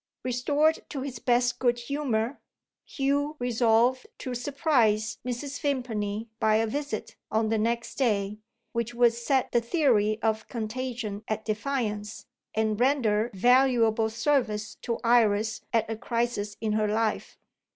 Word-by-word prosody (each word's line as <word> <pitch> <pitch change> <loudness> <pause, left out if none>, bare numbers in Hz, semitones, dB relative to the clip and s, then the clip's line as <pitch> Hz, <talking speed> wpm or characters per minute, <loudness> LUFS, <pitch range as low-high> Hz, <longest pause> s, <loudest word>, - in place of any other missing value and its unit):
Restored 285 +6 +2
to 275 - -4
his 260 -3 -5
best 245 0 +1
good 240 -1 +2
humour, 245 -1 -2 0.4
Hugh 285 +2 -1
resolved 245 +1 +2
to 255 - -5
surprise 245 -5 +1
Mrs. 250 +3 -4
Vimpany 225 -6 -2
by 215 0 +3
a 225 +1 +3
visit, 280 -1 -4
on 220 0 +1
the 225 -1 +1
next 235 +4 -2
day, 210 -5 0 0.3
which 235 +1 -3
would 240 -1 +5
set 250 +3 0
the 240 - +3
theory 230 -6 +2
of 220 -1 0
contagion 230 -2 -4
at 215 0 -3
defiance, 215 -2 -3 0.3
and 220 -1 0
render 240 -4 +2
valuable 235 -1 +4
service 225 -2 0
to 235 - -2
Iris 225 -2 +3
at 225 -2 +2
a 225 - -3
crisis 230 -3 -2
in 220 -1 -1
her 215 0 +1
life. 215 +1 -1
235 Hz, 135 wpm, -27 LUFS, 215-255 Hz, 0.4 s, would